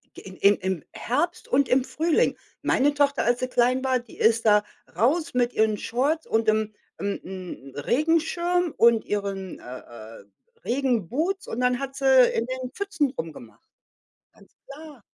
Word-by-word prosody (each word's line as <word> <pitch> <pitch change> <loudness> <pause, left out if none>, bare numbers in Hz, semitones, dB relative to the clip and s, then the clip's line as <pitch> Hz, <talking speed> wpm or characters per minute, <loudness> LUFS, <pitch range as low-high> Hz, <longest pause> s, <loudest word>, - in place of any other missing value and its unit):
G - - -10 0.2
im 200 +1 +5
im 185 -4 -3
Herbst 295 +9 -2
und 275 0 +2
im 255 +1 +3
Frühling. 320 +4 +1 0.3
Meine 285 +2 +2
Tochter, 285 -1 +1
als 240 +1 +2
sie 255 - -1
klein 250 +1 +2
war, 260 -1 +1
die 240 -2 -15
ist 225 +1 +2
da 210 -1 +5 0.3
raus 285 - +1
mit 245 -1 +1
ihren 220 -1 +2
Shorts 280 +10 -1
und 225 0 +1
'n 215 0 0 0.3
'n 200 0 -2
'n 180 -8 -9
Regenschirm 330 - +1
und 230 -1 +4
ihren, 195 -2 -4
äh, 125 +1 -9 0.4
äh, - - -15 0.4
Regenboots 270 - -1
und 225 - -4
dann 250 0 +2
hat 270 -1 -5
sie 265 -2 +6
in 225 - 0
den 255 -1 -5
Pfützen 320 -9 -1
rumgemacht. 155 - -8 0.7
Ganz - - -23
klar. 285 -4 -12
250 Hz, 160 wpm, -25 LUFS, 215-285 Hz, 0.7 s, sie